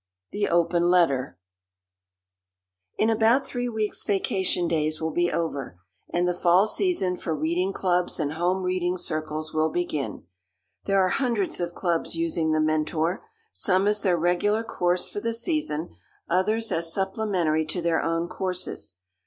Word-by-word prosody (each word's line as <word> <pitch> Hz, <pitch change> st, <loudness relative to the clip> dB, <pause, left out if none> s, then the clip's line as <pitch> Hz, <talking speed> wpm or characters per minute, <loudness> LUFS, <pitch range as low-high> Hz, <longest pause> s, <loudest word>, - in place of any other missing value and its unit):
THE 205 Hz, 0 st, 0 dB
OPEN 170 Hz, 0 st, +2 dB
LETTER 140 Hz, -, +2 dB, 1.6 s
In 220 Hz, +1 st, +3 dB
about 230 Hz, +5 st, +3 dB
three 245 Hz, -1 st, -3 dB
weeks 215 Hz, -2 st, -2 dB
vacation 190 Hz, -3 st, 0 dB
days 155 Hz, -1 st, 0 dB
will 160 Hz, 0 st, -2 dB
be 175 Hz, +1 st, +1 dB
over 140 Hz, -, -3 dB, 0.3 s
and 175 Hz, +1 st, +1 dB
the 180 Hz, -, +2 dB
fall 175 Hz, +2 st, +4 dB
season 215 Hz, -, 0 dB
for 160 Hz, -3 st, -2 dB
reading 170 Hz, +5 st, 0 dB
clubs 180 Hz, -2 st, 0 dB
and 150 Hz, -1 st, -1 dB
home 180 Hz, +3 st, 0 dB
reading 180 Hz, 0 st, 0 dB
circles 155 Hz, -2 st, -4 dB
will 155 Hz, 0 st, +2 dB
begin. 155 Hz, -5 st, -3 dB, 0.6 s
There 195 Hz, 0 st, +3 dB
are -, -, +1 dB
hundreds 235 Hz, -5 st, 0 dB
of 175 Hz, -1 st, -3 dB
clubs 170 Hz, -2 st, -1 dB
using 165 Hz, -1 st, 0 dB
The 155 Hz, -, +2 dB
Mentor 155 Hz, -, 0 dB, 0.3 s
some 190 Hz, 0 st, +2 dB
as 210 Hz, 0 st, +2 dB
their 180 Hz, -3 st, +2 dB
regular 180 Hz, +6 st, +1 dB
course 180 Hz, -5 st, 0 dB
for -, -, -4 dB
the 230 Hz, +2 st, -2 dB
season, 230 Hz, -, -1 dB, 0.3 s
others 215 Hz, +6 st, +1 dB
as 165 Hz, 0 st, -1 dB
supplementary 190 Hz, -5 st, 0 dB
to 170 Hz, -, -2 dB
their 170 Hz, -1 st, +2 dB
own 165 Hz, +1 st, -1 dB
courses. 180 Hz, -, -3 dB
175 Hz, 150 wpm, -26 LUFS, 160-195 Hz, 1.6 s, fall